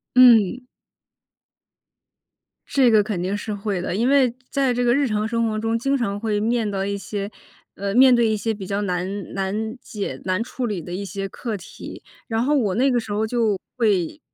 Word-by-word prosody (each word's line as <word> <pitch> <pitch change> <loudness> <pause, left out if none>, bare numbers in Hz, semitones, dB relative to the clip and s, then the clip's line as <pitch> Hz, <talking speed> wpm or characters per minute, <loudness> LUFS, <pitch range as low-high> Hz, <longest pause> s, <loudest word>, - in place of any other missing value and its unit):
嗯。 250 -1 +6 2.0
这 260 -4 +4
个 215 -1 +6
肯 200 -4 -3
定 195 +2 -1
是 210 +1 -4
会 200 -2 -2
的， 180 - -3
因 235 +5 +1
为 275 -3 +4 0.2
在 270 -3 +1
这 245 +1 0
个 240 - +4
日 280 +1 +2
常 215 -2 0
生 230 0 0
活 215 - -2
中， 225 +1 0
经 275 +3 +1
常 200 -4 -2
会 215 -1 -1
面 225 0 0
对 195 -1 -2
一 200 0 -2
些 200 0 -5 0.4
呃， 200 +2 -3
面 260 0 +7
对 235 -1 +4
一 220 - +1
些 220 +2 -1
比 200 -3 -7
较 200 +1 -1
难 190 +1 -3
难 210 +5 -2
解、 205 -2 -5
难 185 +3 0
处 250 +1 -4
理 205 -6 -2
的 175 - -9
一 200 +2 -4
些 195 0 -5
课 225 +2 -4
题。 180 -4 -10 0.2
然 225 -1 0
后 295 +4 +2
我 205 -8 +1
那 265 +4 +3
个 245 - +2
时 220 -2 -5
候 215 +2 0
就 220 -3 +1 0.2
会 200 -8 +1
215 Hz, 220 characters per minute, -22 LUFS, 200-240 Hz, 2.0 s, 面